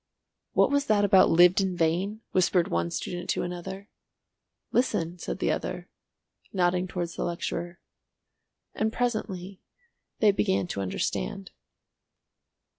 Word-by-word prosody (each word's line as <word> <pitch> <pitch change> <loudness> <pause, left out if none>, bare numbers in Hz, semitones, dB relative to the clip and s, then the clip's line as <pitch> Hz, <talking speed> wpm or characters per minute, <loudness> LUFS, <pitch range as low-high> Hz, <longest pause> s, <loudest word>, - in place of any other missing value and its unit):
"What - - +4
was 285 0 +1
that 205 -1 +4
about 190 -1 +6
'lived 180 +3 +6
in 185 -2 -1
vain?'" 180 +7 0
whispered 180 -1 +2
one 85 0 0
student 175 - -5
to - - 0
another. 190 +3 -6 0.8
"Listen," 175 -8 0
said - - -4
the - - 0
other, - - -4 0.6
nodding 180 -1 +1
towards 175 -2 -4
the - - -2
lecturer. 175 0 -3 1.0
And 220 0 0
presently 200 -6 -3 0.6
they 215 -2 +5
began 100 - +1
to 100 - -3
understand. 190 - -3
180 Hz, 120 wpm, -27 LUFS, 175-200 Hz, 1.0 s, about